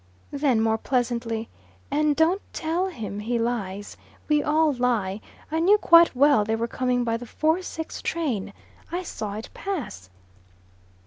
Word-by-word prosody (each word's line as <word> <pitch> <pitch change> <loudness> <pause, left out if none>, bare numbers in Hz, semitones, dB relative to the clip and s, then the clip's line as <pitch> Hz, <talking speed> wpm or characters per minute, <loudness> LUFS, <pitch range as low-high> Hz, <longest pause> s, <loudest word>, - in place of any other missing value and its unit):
Then 275 -5 +2
more 220 0 +1
pleasantly, 235 -3 -1 0.4
"And 300 0 +2
don't 335 +6 +3
tell 335 +3 -1
him 220 - -6
he 235 +3 -1
lies. 205 -4 -3 0.3
We 300 -1 +3
all 305 0 +2
lie. 225 -6 0 0.3
I 320 - 0
knew 390 +6 +5
quite 335 -6 +6
well 280 -3 +5
they 220 +2 0
were 230 +1 -2
coming 250 0 0
by 230 -1 0
the 245 +1 -9
four 315 +8 +1
six 320 -3 -6
train. 255 - -2 0.4
I 355 +2 -2
saw 210 - -5
it 220 - -7
pass." 295 - -5
250 Hz, 150 wpm, -25 LUFS, 225-320 Hz, 0.4 s, quite